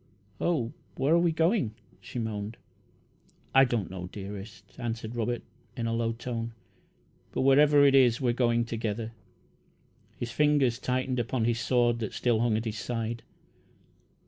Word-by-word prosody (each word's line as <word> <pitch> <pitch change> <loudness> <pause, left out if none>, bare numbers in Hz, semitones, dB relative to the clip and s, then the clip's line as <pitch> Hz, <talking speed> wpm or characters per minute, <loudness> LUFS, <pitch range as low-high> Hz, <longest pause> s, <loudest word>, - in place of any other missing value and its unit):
"Oh, 135 -9 0 0.2
where 135 +4 +2
are 170 - +6
we 170 -1 +3
going!" 160 - +1 0.2
she - - -9
moaned. 110 -1 -3 1.0
"I 135 0 +7
don't 115 -8 -2
know, 90 -1 -6
dearest," 100 +1 -8 0.2
answered 115 -1 -4
Robert, 120 +1 -1 0.3
in 115 - -2
a 115 - 0
low 115 0 0
tone; 115 0 -4 0.8
"but - - 0
wherever 145 +2 +6
it 140 - +5
is, 125 -3 +5
we're 125 -3 +1
going 120 -1 +2
together." 115 -1 -3 1.1
His 120 -1 -4
fingers 140 -3 +3
tightened 130 0 -1
upon 120 0 0
his 115 0 +1
sword, 120 -2 +2
that 110 - -4
still 120 -3 +1
hung 115 -2 +2
at 110 - -3
his 110 -1 -3
side. 115 +1 -3
120 Hz, 150 wpm, -28 LUFS, 115-130 Hz, 1.1 s, I